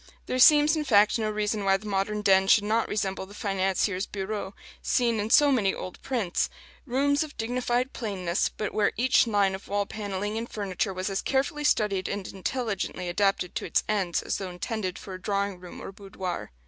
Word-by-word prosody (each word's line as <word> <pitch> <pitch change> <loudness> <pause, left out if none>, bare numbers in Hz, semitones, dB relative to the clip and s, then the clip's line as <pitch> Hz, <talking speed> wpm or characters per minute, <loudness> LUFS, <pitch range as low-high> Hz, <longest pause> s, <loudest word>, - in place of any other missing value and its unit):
There 255 - -2
seems, 300 +3 +7
in 310 - -1
fact, 215 -4 +4
no 215 -1 0
reason 210 0 -1
why 195 0 +3
the 205 - -14
modern 210 +1 -1
den 190 -1 +4
should 205 +1 +5
not 220 +2 +1
resemble 195 -2 -2
the 200 - -13
financiers' 195 -1 0
bureaux 200 0 -4 0.3
seen 235 -3 +1
in 210 +1 -2
so 290 +4 +6
many 205 -7 +2
old 185 - -8
prints: 225 -9 -1 0.4
rooms 285 +3 +2
of 305 - -10
dignified 245 +2 -1
plainness, 190 -6 -1
but 210 - -5
where 210 -1 +2
each 250 +1 +4
line 200 -3 +2
of 190 - -7
wall 205 0 0
panelling 205 +1 -4
and 235 - -6
furniture 200 -1 -2
was 185 +1 -3
as 195 - -1
carefully 280 +2 0
studied 205 -9 +1
and 200 -2 -4
intelligently 195 -3 -3
adapted 195 -1 +1
to - - -3
its - - +1
ends 190 -5 0
as - - -2
though 190 -2 -4
intended 185 +1 -4
for 195 - -9
a 185 - -8
drawing 200 -1 -1
room 180 -1 -10
or - - -7
boudoir. 190 - -6
205 Hz, 195 wpm, -27 LUFS, 190-230 Hz, 0.4 s, seems